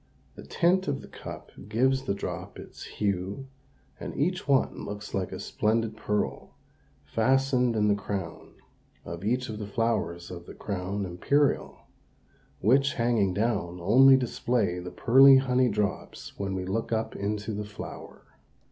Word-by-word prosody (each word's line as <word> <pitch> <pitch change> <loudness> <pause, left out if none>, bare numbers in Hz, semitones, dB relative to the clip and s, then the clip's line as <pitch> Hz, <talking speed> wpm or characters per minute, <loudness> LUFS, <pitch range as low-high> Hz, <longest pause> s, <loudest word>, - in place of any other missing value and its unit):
The - - -11
tint 185 +2 +1
of 140 -2 -1
the - - -11
cup - - -9 0.2
gives 130 +3 +2
the 100 - 0
drop - - -6
its - - -10
hue 100 +4 -2 0.5
and - - -6
each 180 +5 -1
one 135 -2 +2
looks 105 0 -7
a 95 -2 -3
splendid 110 0 0
pearl 105 -1 -3 0.5
fastened 125 0 +2
in 105 -1 +2
the 105 - +4
crown 100 -3 -5 0.5
of 85 +1 -7
each 125 +4 0
of 105 -1 -6
the 105 - -5
flowers 105 -6 -1
of 85 -1 -9
the - - -10
crown 100 0 -3
imperial 135 +11 0 0.8
which, 135 +7 +3
hanging 115 -6 +1
down, 100 -5 -1
only 130 +9 +7
display 120 -6 0
the 90 0 -6
pearly 135 +6 +7
honey 130 -1 +2
drops 105 -1 -3
when 95 -1 -3
we 90 -1 -3
look 110 +6 -2
up 110 0 -1
into 105 +2 -3
the 105 +1 -3
flower. 105 0 -9
110 Hz, 145 wpm, -27 LUFS, 100-130 Hz, 0.8 s, only